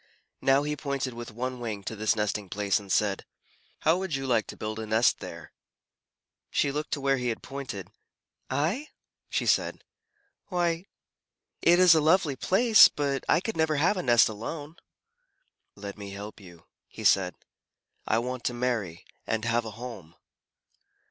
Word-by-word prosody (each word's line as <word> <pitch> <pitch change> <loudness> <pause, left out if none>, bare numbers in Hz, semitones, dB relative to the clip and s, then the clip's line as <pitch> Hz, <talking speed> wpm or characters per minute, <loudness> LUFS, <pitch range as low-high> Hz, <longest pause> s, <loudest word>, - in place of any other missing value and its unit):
Now 135 +1 +4
he 150 0 -2
pointed 140 -3 -3
with 120 0 -7
one 125 +3 -4
wing 110 -4 -4
to 110 - -5
this 110 +2 +1
nesting 105 -2 -2
place, 100 +1 0
and 100 -2 -9
said, 100 -1 +1 0.6
"How 160 +3 +3
would 190 -5 -2
you 135 0 -3
like 120 -4 +1
to - - -9
build 110 +1 -4
a 110 - -5
nest 110 +3 +3
there?" - - -9 1.0
She 140 - +1
looked 150 +1 -3
where 135 -1 +1
he 125 -1 -2
had 115 - -3
pointed, 135 -9 -7 0.6
"I?" 190 - -1 0.4
she - - -1
said. - - +1 0.6
"Why, 175 -1 -1 0.7
it 175 +1 +5
is 180 -2 +7
a 160 - +4
lovely 155 -2 +3
place, 220 - +6
but 140 -2 -2
I - - +4
could 225 - -4
never 160 -1 +1
have 160 +8 +3
a 185 - -2
nest 120 -6 +5
alone." 145 +9 -6 1.0
"Let 100 0 -8
me 100 -1 -7
help 100 +2 -8
you," 85 -4 -15 0.2
he - - -10
said. 90 -2 +3 0.7
"I 110 - +2
want 125 +1 -3
to 120 - 0
marry 110 -9 -2 0.2
and 115 0 -1
have 115 0 +1
a - - -4
home." 105 -9 -9
125 Hz, 165 wpm, -28 LUFS, 110-150 Hz, 1.0 s, is